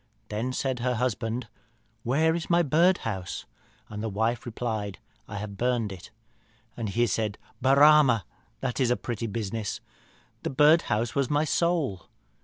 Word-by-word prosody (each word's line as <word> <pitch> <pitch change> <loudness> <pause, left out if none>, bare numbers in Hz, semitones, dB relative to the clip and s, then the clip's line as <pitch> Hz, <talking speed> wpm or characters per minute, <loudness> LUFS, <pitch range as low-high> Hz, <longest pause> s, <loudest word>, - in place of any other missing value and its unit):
Then 110 +5 -2
said 130 -1 -2
her 125 +1 0
husband, 115 0 -2 0.5
'Where 155 +8 +2
is 165 -1 -4
my 175 0 +4
birdhouse?' 140 - +1 0.4
And 105 0 -6
the 110 - -2
wife 115 +4 -1
replied, 110 -4 -3 0.3
'I 100 - -6
have 100 -1 -6
burnt 120 -2 0
it.' 95 +3 -10 0.7
And 115 -3 -3
he 120 +4 +2
said, 105 -1 -1 0.2
'Barama, 140 -3 +6 0.4
that 130 -1 -2
is 130 -3 +3
a 125 - +2
pretty 115 -1 -4
business 105 0 -3 0.6
that - - -2
birdhouse 145 -7 +4
was 140 -3 0
my 150 +1 +2
soul.' 155 - 0
120 Hz, 145 wpm, -27 LUFS, 110-140 Hz, 0.7 s, Barama